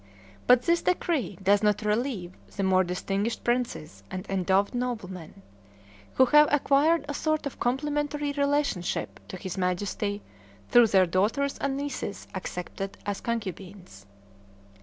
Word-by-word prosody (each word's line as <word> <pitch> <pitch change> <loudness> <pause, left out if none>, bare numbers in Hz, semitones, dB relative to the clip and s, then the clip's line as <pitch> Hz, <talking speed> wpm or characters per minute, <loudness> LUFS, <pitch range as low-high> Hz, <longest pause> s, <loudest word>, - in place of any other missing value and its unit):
But 250 0 +6
this 340 0 +2
decree 330 - 0
does 200 +2 +4
not 210 0 +2
relieve 210 -4 -1 0.2
the 200 - -1
more 190 0 +4
distinguished 195 +5 -2
princes 240 -9 -2
and 185 +1 -5
endowed 195 +2 +1
noblemen, 195 -8 -5 0.7
who 260 - +6
have 295 +4 +6
acquired 295 +2 +3
a 290 - -3
sort 310 0 -1
of 280 - -6
complimentary 290 +3 -1
relationship 285 -10 -1
to 185 - -7
his 185 0 -5
Majesty 200 +3 -2 0.5
through 240 -1 +7
their 190 -3 +4
daughters 215 +11 0
and 275 -1 -1
nieces 280 -7 -5
accepted 190 +1 -5
as 205 -1 -3
concubines. 190 - -6
215 Hz, 130 wpm, -27 LUFS, 190-280 Hz, 0.7 s, through